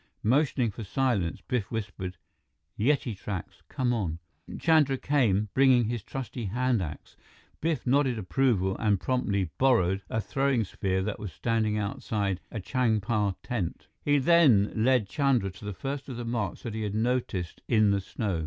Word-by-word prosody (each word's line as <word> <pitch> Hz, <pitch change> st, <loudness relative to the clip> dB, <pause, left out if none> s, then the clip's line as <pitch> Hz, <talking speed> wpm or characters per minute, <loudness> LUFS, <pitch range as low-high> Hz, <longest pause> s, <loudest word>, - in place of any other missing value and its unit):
Motioning 130 Hz, -1 st, +2 dB
for 115 Hz, -, -7 dB
silence, 105 Hz, -6 st, 0 dB
Biff 125 Hz, -6 st, -1 dB
whispered: 95 Hz, -5 st, -5 dB, 0.6 s
"Yeti 120 Hz, -1 st, +1 dB
tracks! 95 Hz, -2 st, -6 dB
Come 125 Hz, -2 st, 0 dB
on!" 90 Hz, -9 st, -2 dB, 0.4 s
Chandra 155 Hz, -5 st, +4 dB
came, 110 Hz, -8 st, +1 dB
bringing 130 Hz, -3 st, +5 dB
his 120 Hz, 0 st, -2 dB
trusty 125 Hz, +1 st, -5 dB
hand 120 Hz, +2 st, +1 dB
axe. 75 Hz, -4 st, -7 dB, 0.5 s
Biff 160 Hz, -1 st, -1 dB
nodded 130 Hz, -1 st, +2 dB
approval 100 Hz, -3 st, +1 dB
and 105 Hz, -3 st, +2 dB
promptly 100 Hz, -5 st, 0 dB
"borrowed" 100 Hz, -8 st, +3 dB
a 110 Hz, -, -1 dB
throwing 135 Hz, +1 st, +1 dB
spear 95 Hz, -1 st, -1 dB
that 105 Hz, 0 st, -3 dB
was 105 Hz, -4 st, -6 dB
standing 110 Hz, -1 st, 0 dB
outside 100 Hz, -2 st, -2 dB
a 110 Hz, -, -4 dB
Changpa 110 Hz, -3 st, 0 dB
tent. 100 Hz, -9 st, -4 dB
He 145 Hz, 0 st, +3 dB
then 135 Hz, -9 st, +5 dB
led 115 Hz, -1 st, +3 dB
Chandra 130 Hz, -7 st, +1 dB
to 105 Hz, -, -12 dB
the 105 Hz, -, -3 dB
first 135 Hz, +7 st, -5 dB
of 125 Hz, -, -5 dB
the 120 Hz, -, -4 dB
marks 115 Hz, -5 st, -3 dB
that 115 Hz, -, -4 dB
he 110 Hz, -, -3 dB
had 105 Hz, -1 st, -2 dB
noticed 110 Hz, -7 st, -1 dB
in 110 Hz, -3 st, +4 dB
the 100 Hz, 0 st, +1 dB
snow. 95 Hz, -2 st, -3 dB
110 Hz, 160 wpm, -28 LUFS, 100-130 Hz, 0.6 s, bringing